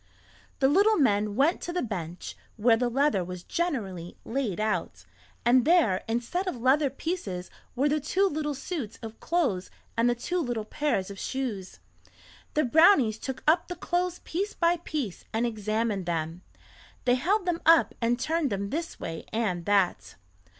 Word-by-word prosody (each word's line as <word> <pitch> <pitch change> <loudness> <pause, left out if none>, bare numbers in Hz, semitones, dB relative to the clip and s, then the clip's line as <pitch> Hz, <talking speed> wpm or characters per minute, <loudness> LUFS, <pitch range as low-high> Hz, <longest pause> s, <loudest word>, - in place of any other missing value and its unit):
The 265 - +3
little 405 +9 +4
men 210 - +2
went 290 - +2
to 345 - -4
the 360 - -1
bench 180 -6 -5 0.2
where 225 +1 +5
the 245 +1 0
leather 270 -6 +2
was 180 0 -7
generally 200 - -3
laid 230 -6 -2
out, 215 0 -2 0.4
and 245 +1 +5
there, 310 - +3
instead 240 +12 -2
of 365 - -1
leather 270 +4 +3
pieces 255 - -4 0.2
were 270 +4 +2
the 300 +1 +1
two 360 +7 +1
little 300 -4 -2
suits 270 - -5
of 225 0 -8
clothes 265 - 0 0.3
and 230 +1 +3
the 240 - +1
two 355 +10 -2
little 240 -8 -2
pairs 215 -8 -1
of 195 - -9
shoes. 230 -8 -4 0.8
The 305 - +3
brownies 270 - +5
took 265 -2 -5
up 315 +4 +3
the 355 - -5
clothes 355 0 -1
piece 395 +5 -3
by 340 0 +2
piece 295 - -4
and 225 +2 +1
examined 215 -3 -1
them; 165 0 -2 0.6
they 245 - +4
held 365 +10 +1
them 350 -2 -1
up 330 0 +6
and 235 +1 +1
turned 320 +1 0
them 200 -1 -3
this 325 +2 -4
way 165 -1 -6
and 200 -7 -1
that. 190 - +1
245 Hz, 165 wpm, -27 LUFS, 205-325 Hz, 0.8 s, up